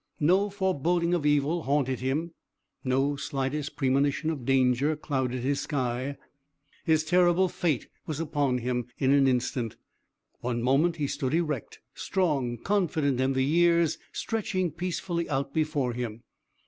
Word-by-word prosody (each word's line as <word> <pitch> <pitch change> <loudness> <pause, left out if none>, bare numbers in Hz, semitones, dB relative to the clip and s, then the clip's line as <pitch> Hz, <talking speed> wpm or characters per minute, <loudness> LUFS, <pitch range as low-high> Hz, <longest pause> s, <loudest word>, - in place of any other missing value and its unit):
No 185 +7 +3
foreboding 175 -3 0
of 160 -4 +1
evil 145 +3 +2
haunted 135 -3 0
him; 150 +7 -2 0.5
no 135 +2 +1
slightest 140 +2 -3
premonition 140 +3 +1
of 140 -6 -5
danger 135 +3 +3
clouded 130 -4 -2
his 140 +2 0
sky. 130 0 -2 0.7
His 155 -2 +3
terrible 175 +2 +4
fate 170 -4 -1 0.2
was 155 -2 -3
upon 145 -5 0
him 125 -1 -2
in 135 -1 +2
an 140 -1 +5
instant. 125 -2 0 0.6
One 120 -1 -2
moment 145 +7 +3
he 150 - -1
stood 135 +1 -1
erect, 155 -7 -2
strong, 140 -10 0
confident 155 - 0
in 135 +1 +2
the 130 0 +1
years 170 +1 +3
stretching 185 -6 -2
peacefully 175 0 -3
out 140 -1 -1
before 150 -5 0
him. 115 -2 -5
145 Hz, 135 wpm, -28 LUFS, 130-170 Hz, 0.7 s, an